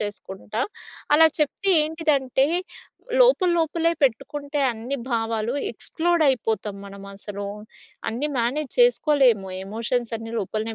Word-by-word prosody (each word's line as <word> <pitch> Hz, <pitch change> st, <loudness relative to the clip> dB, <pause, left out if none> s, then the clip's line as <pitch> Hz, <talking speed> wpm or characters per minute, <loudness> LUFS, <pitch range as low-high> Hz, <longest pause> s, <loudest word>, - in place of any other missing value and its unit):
చేసుకుంటా. 205 Hz, +1 st, -5 dB, 0.5 s
అలా 320 Hz, +2 st, +8 dB
చెప్తే 310 Hz, +6 st, 0 dB
ఏంటిదంటే 290 Hz, -4 st, +1 dB, 0.7 s
లోపల 485 Hz, -8 st, +5 dB
లోపలే 330 Hz, +1 st, +1 dB
పెట్టుకుంటే 285 Hz, +4 st, -1 dB
అన్ని 235 Hz, +5 st, -4 dB
భావాలు 225 Hz, 0 st, -1 dB, 0.2 s
ఎక్స్ 235 Hz, -, -12 dB
ప్లోడ్ 340 Hz, -1 st, +3 dB
అయిపోతాం 220 Hz, -5 st, -1 dB
మనమసలు. 200 Hz, 0 st, -8 dB, 0.6 s
అన్నీ 270 Hz, +7 st, -2 dB
మేనేజ్ 260 Hz, +5 st, -1 dB
చేసుకోలేము 275 Hz, -, +4 dB
ఎమోషన్స్ 230 Hz, +3 st, -2 dB
అన్నీ 225 Hz, 0 st, -8 dB
లోపలనే 220 Hz, +3 st, -3 dB
245 Hz, 105 wpm, -24 LUFS, 220-300 Hz, 0.7 s, అలా